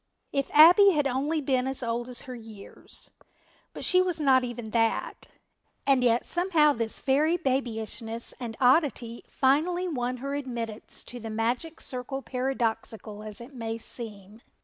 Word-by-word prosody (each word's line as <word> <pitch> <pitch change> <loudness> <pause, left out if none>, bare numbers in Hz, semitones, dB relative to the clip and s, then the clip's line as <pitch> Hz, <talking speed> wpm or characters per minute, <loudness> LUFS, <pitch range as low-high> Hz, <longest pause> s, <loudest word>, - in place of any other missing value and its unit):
If 275 -1 -1
Abbie 360 +6 +8
had 295 -2 +1
only 280 +4 0
been 260 -2 0
as 265 -1 -3
old 235 +1 -2
as 250 - -3
her 255 - -8
years, 220 -4 -10 0.6
but - - -4
she 365 0 +5
was 360 -3 -1
not 265 -3 +4
even 240 -3 -6
that, 225 0 0 0.6
and 270 -2 +3
yet 235 0 +3
somehow 335 -4 +3
this 230 -2 0
very 300 +5 +2
babyishness 230 -5 -2
and 230 -3 -6
oddity 250 -3 +2
finally 330 +7 +1
won 255 -6 -2
her 275 +3 -4
admittance 235 -6 -4
to 245 - -8
the 225 -1 -7
magic 240 +9 -2
circle 260 +2 -4
paradoxical 230 -4 -3
as 215 0 -6
it 240 +4 -11
may 225 -2 -4
seem. 215 -2 -7
250 Hz, 150 wpm, -27 LUFS, 230-285 Hz, 0.6 s, Abbie